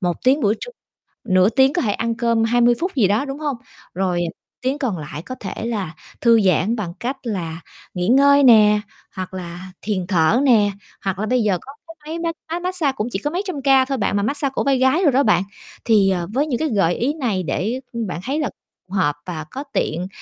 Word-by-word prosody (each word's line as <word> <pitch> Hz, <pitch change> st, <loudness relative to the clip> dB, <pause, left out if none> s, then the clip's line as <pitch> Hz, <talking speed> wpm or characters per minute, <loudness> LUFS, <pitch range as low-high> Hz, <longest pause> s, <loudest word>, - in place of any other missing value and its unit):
1 175 Hz, -3 st, 0 dB
tiếng 270 Hz, +4 st, +4 dB
buổi 210 Hz, -1 st, +2 dB
trưa, -, -, -6 dB, 0.5 s
nửa 185 Hz, -2 st, +4 dB
tiếng 265 Hz, +4 st, +3 dB
có 350 Hz, -, +1 dB
thể 210 Hz, -, +1 dB
ăn 230 Hz, 0 st, -2 dB
cơm 230 Hz, -1 st, +1 dB
20 240 Hz, +1 st, +3 dB
phút 360 Hz, -1 st, -2 dB
gì 215 Hz, -8 st, +4 dB
đó, 210 Hz, +7 st, +1 dB
đúng 275 Hz, +1 st, -6 dB
hông? 290 Hz, -5 st, -2 dB, 0.4 s
Rồi, 180 Hz, -1 st, 0 dB
ờ, 165 Hz, -, -3 dB, 0.3 s
tiếng 260 Hz, +3 st, -1 dB
còn 245 Hz, -10 st, -2 dB
lại 150 Hz, 0 st, -7 dB
có 255 Hz, -, -7 dB
thể 205 Hz, +3 st, -5 dB
là 200 Hz, -8 st, -3 dB, 0.3 s
thư 230 Hz, -2 st, +5 dB
giãn 190 Hz, +4 st, +2 dB
bằng 185 Hz, -7 st, -4 dB
cách 260 Hz, +3 st, -3 dB
là 170 Hz, -7 st, -4 dB, 0.3 s
nghỉ 180 Hz, +1 st, -2 dB
ngơi 280 Hz, +3 st, +5 dB
nè, 210 Hz, -4 st, +6 dB, 0.4 s
hoặc 185 Hz, 0 st, -5 dB
là 180 Hz, 0 st, -7 dB
thiền 190 Hz, -4 st, -2 dB
thở 175 Hz, +4 st, +3 dB
nè. 215 Hz, -6 st, +4 dB, 0.3 s
Hoặc 190 Hz, -1 st, -1 dB
là 215 Hz, -, -1 dB
bây 250 Hz, +3 st, +1 dB
giờ 195 Hz, -4 st, +2 dB
có 275 Hz, -, -11 dB, 0.2 s
cái 330 Hz, -, -11 dB, 0.2 s
máy 335 Hz, -, -3 dB
mát 335 Hz, -1 st, -2 dB, 0.2 s
máy 345 Hz, -, -1 dB
mát 365 Hz, +1 st, -3 dB
xa 310 Hz, -6 st, +1 dB
cũng 225 Hz, -3 st, -3 dB
chỉ 195 Hz, -, -2 dB
có 295 Hz, -, -2 dB
mấy 360 Hz, -, -1 dB
trăm 330 Hz, -7 st, -4 dB
ca 270 Hz, -1 st, +4 dB
thôi 270 Hz, 0 st, -2 dB
bạn, 205 Hz, -2 st, 0 dB
mà 200 Hz, -, 0 dB
mát 280 Hz, +7 st, -1 dB
xa 280 Hz, -, 0 dB
cổ 270 Hz, -, -2 dB
vai 275 Hz, -1 st, +2 dB
gái 260 Hz, +8 st, +3 dB
đồ 295 Hz, -, +5 dB
đó 270 Hz, +2 st, +3 dB
bạn. 210 Hz, -3 st, +3 dB, 0.4 s
Thì, 210 Hz, -4 st, +4 dB
ờ, 175 Hz, -2 st, -1 dB
với 285 Hz, +5 st, +1 dB
những 250 Hz, -6 st, -1 dB
cái 315 Hz, -1 st, 0 dB
gợi 195 Hz, -6 st, +2 dB
ý 270 Hz, +5 st, 0 dB
này 230 Hz, -, -1 dB
để, 200 Hz, -, -2 dB
ưm, 230 Hz, -3 st, -3 dB
bạn 175 Hz, -, -4 dB
thấy 280 Hz, +4 st, -1 dB
là 300 Hz, -, -1 dB, 0.4 s
hợp 150 Hz, -7 st, +1 dB
và 160 Hz, -4 st, -5 dB
có 275 Hz, +2 st, -5 dB
tiện 175 Hz, +4 st, -1 dB
230 Hz, 245 wpm, -21 LUFS, 190-270 Hz, 0.5 s, nè